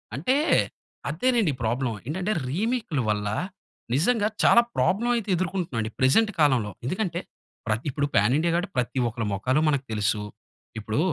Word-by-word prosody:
అంటే 175 - +1 0.7
అదేనండి 225 - +1
ప్రాబ్లమ్. 120 0 -1
ఏంటంటే 185 +7 -2 0.2
రీమేక్ల 205 - -1
వల్ల 105 -1 0 0.7
నిజంగా 210 - +2 0.2
చాలా 235 - +7
ప్రాబ్లమ్ 235 +5 +2
అయితే 225 -3 -3
ఎదుర్కొంటున్నా 180 -7 -2
అండి 110 0 -4
ప్రెజెంట్ 215 +13 +4
కాలంలో. 130 -9 +3
ఎందుకంటే, 180 - -1 0.5
ప్ర 110 - +1 0.2
ఇప్పుడు 145 +1 -1
పాన్ 105 +5 +4
ఇండియా 170 +2 +1
కాబట్టి 180 +3 -1
ప్రతి 125 +1 0
ఒక్కరి 115 0 -4
మొఖాలు 130 +9 +1
మనకు 140 -2 0
తెలుసు. 105 0 0 0.6
ఇప్పుడు 110 +4 -2
150 Hz, 140 wpm, -25 LUFS, 120-195 Hz, 0.7 s, చాలా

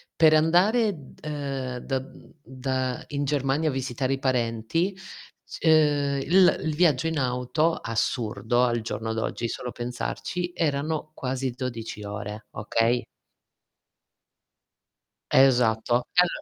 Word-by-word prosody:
per 160 -1 +6
andare 190 +8 +4
d 140 -4 -15
uhm, 135 -4 -3
da 135 -1 0
mhmm, 135 - -15
da 130 -1 -3
in 145 -1 -2
Germania 145 +2 +1
a - - 0
visitare 130 0 -2
i 135 - -2
parenti 130 - 0 0.5
s - - -9
uhm, 145 -3 +3
il 180 +6 +5
uhm, - - -6
il 155 - -1
viaggio 160 -4 +3
in 160 -1 -1
auto, 125 +6 +1
assurdo 115 +1 0
al 120 -2 +1
giorno 110 0 -3
d'oggi 115 +1 -2
solo 125 +1 -5
pensarci, 125 +9 -4
erano 155 -1 -1
quasi 130 -2 -2
12 120 -4 -5
ore, 105 +1 -6
okay? 115 +3 0 2.3
Esatto. 120 -2 +4
E 180 - +5
al - - +3
130 Hz, 130 wpm, -26 LUFS, 120-155 Hz, 2.3 s, per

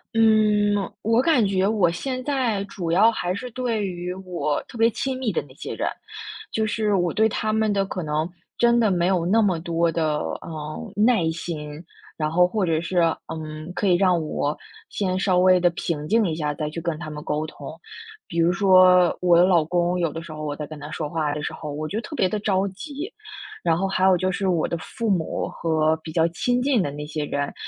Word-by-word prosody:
嗯， 215 -2 +4 0.3
我 225 +3 +3
感 265 -7 +3
觉 195 0 +1
我 205 -6 +3
现 255 +8 -4
在 250 -8 0
主 180 -4 -5
要 215 +6 +5
还 180 -5 -2
是 250 +5 -6
对 230 -4 -1
于 180 -1 -4
我 180 -5 -2
特 - - -15
别 225 0 +4
亲 260 +3 -3
密 235 -5 0
的 - - 0
那 130 - -16
些 - - -6
人。 - - -2 0.6
就 220 0 0
是 215 -1 0
我 175 -2 +1
对 220 +1 +3
他 215 +1 -1
们 220 -1 +2
的 195 -1 +1
可 185 -1 -4
能， 155 +1 -1 0.3
真 235 0 +4
的 220 -3 +3
没 175 -2 +1
有 180 -2 +2
那 205 +6 +3
么 180 -5 +1
多 170 -1 0
的， 155 -2 0 0.2
呃， 155 -1 -7
耐 210 -6 +3
心， 160 -1 -6 0.3
然 155 -1 -1
后 180 +1 +4
或 195 0 0
者 160 -1 +1
是， 175 +2 -3 0.3
嗯， 155 +1 -7
可 - - -1
以 185 - +4
让 180 -1 +3
我 150 -1 -2 0.3
先 185 -2 -1
稍 185 -2 +2
微 185 0 +5
地 175 0 +4
平 165 -4 -3
静 220 -1 +3
一 160 - -1
下， 150 -2 -1
再 155 -2 -3
去 165 - -5
跟 165 -2 -2
他 155 -2 -7
们 150 0 -7
沟 155 +1 -1
通。 155 +1 -9 0.5
比 170 - -3
如 170 +1 +4
说 185 -1 +5
我 175 -1 +5
老 175 -4 +4
公， 175 +2 0
有 165 -3 0
的 165 +2 -6
时 165 - -10
候 155 0 -7
我 145 -1 -3
在 150 - -5
跟 155 0 -10
他 145 +1 -8
说 155 -1 -4
话 155 -2 -1
的 150 - -4
时 - - -3
候， 150 -2 -6
我 155 +2 -4
就 215 +6 -3
特 300 - -8
别 185 - +2
地 210 +3 -2
着 200 -1 +1
急， 290 - -7 0.5
然 165 -1 +2
后 195 +2 0
还 190 -1 +1
有 185 -2 +5
就 185 +1 0
是 190 +1 -2
我 170 -4 +1
的 170 - -2
父 230 +7 -5
母 180 -6 0
和 160 -1 +1
比 160 0 -9
较 165 0 +3
亲 245 +8 0
近 265 -7 +3
的 145 - -1
那 150 +1 -6
些 150 0 -3
人。 145 0 -2
180 Hz, 245 characters per minute, -23 LUFS, 160-210 Hz, 0.6 s, 要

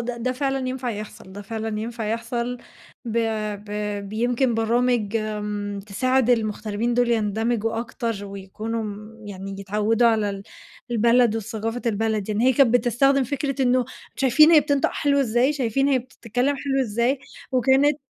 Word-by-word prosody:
ده 235 +1 -3
ده 250 +2 -1
فعلًا 270 -1 -1
ينفع 255 -1 -3
يحصل، 210 -3 -8
ده 205 +1 -8
فعلًا 220 0 -4
ينفع 230 0 -4
يحصل 235 +2 -2 0.5
ب 235 0 -1 0.5
ب 205 - -12 0.4
بيمكن 240 +3 +1
برامج 230 -1 +1
آمم، 210 -2 -3
تساعد 250 +5 +1
المغتربين 220 0 0
دول 245 0 +2
يندمجوا 225 +1 0
أكتر 230 -3 -4
ويكونوا 205 +3 -5 0.4
يعني 195 0 -7
يتعوّدوا 210 +4 +2
على 215 -2 +1
ال 195 0 -6 0.5
البلد 235 0 +3
وثقافة 225 +2 -4
البلد، 220 -2 0
يعني 215 +2 0
هي 260 - +5
كانت 250 -2 +4
بتستخدم 265 +3 +3
فكرة 275 +1 -2
إنه 250 0 +3 0.3
شايفين 275 +4 +6
هي 320 -2 +8
بتنطق 285 -1 +1
حلو 280 -1 +2
إزاي، 245 +3 +2
شايفين 270 0 0
هي 270 -2 +3
بتتكلم 250 +2 -2
حلو 270 0 -1
إزاي، 235 +4 0 0.3
وكانت 265 +4 +3
235 Hz, 145 wpm, -23 LUFS, 215-255 Hz, 0.5 s, هي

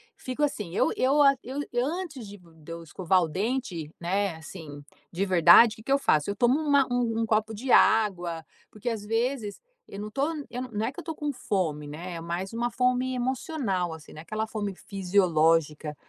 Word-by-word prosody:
fico 255 +3 -4
assim, 215 - -2
eu - - +2
eu 270 +3 +2
a 275 -1 +6
eu 265 +4 -5 0.2
antes 300 - -4
de 205 +1 -10
de 165 -3 -15
eu 165 0 -7
escovar 180 +2 +1
o - - -1
dente, 190 - -3
né, 190 +1 -1
assim, 160 -2 -10 0.3
de 185 +3 -1
verdade, 185 +5 +7
que 220 - -14
que 250 - -5
eu 275 - +5
faço? 155 - +2
Eu 200 - -2
tomo 245 +7 +3
uma 285 -3 +3
um 235 -2 0
um - - +1
copo 220 0 0
de 250 +5 -3
água, 175 -7 +3 0.2
porque 215 +2 -11
às 225 -3 -1
vezes 225 0 -2 0.3
eu 200 - -9
não 210 +1 -5
tô 275 +6 0 0.2
eu 250 - -5
não 215 0 -1
é 240 - -2
que 280 - -10
eu - - -7
tô 325 - -4
com 295 -1 -3
fome, 165 - -2
né, 170 +5 -7
é 165 - -6
mais 175 +4 -4
uma 240 +1 -1
fome 250 +1 +1
emocional 245 - -2
assim, 160 -2 -12
não - - -10
é - - -7
aquela 215 +6 -3
fome 210 -2 -4
fisiológica, 165 -6 +1
205 Hz, 205 wpm, -27 LUFS, 170-250 Hz, 0.3 s, verdade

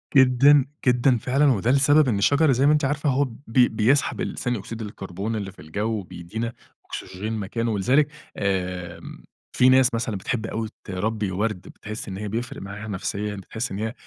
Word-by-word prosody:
جدًا، 135 +2 +6 0.2
جدًا 125 0 +4
فعلًا. 135 +6 +1
وده 115 +4 +1
لسبب 145 +1 +5
إن 105 -5 +1
الشجر 140 +8 +4
زي 130 +2 +3
ما 150 - +6
أنتِ 150 -2 +2
عارفة 145 +1 0
هو 135 +2 +2
ب 120 -5 -6
بيسحب 120 +2 +2
ثاني 125 -2 -1
أكسيد 115 +3 -7
الكربون 100 +1 -5
اللي 100 -2 -4
في 95 - -16
الجَو 100 +8 -3
وبيدّينا 110 +6 -5 0.3
أكسجين 105 +4 -5
مكانه 115 +2 -2
ولذلك 130 +9 +3 0.3
آمم 90 -3 -3 0.3
في 125 +1 +6
ناس 130 -1 +5
مثلًا 115 -2 -1
بتحب 110 +4 -2
أوي 110 -1 -3
تربّي 105 +1 -2
ورد، 105 0 -1
بتحِس 110 +1 -8
إن 95 -1 -5
هي 105 0 -4
بيفرق 115 +4 -4
معاها 100 +2 -7
نفسيًا، 105 +1 -3
بتحِس 110 +4 -5
إن 100 - -4
هي 110 +1 -2
110 Hz, 175 wpm, -24 LUFS, 100-130 Hz, 0.3 s, جدًا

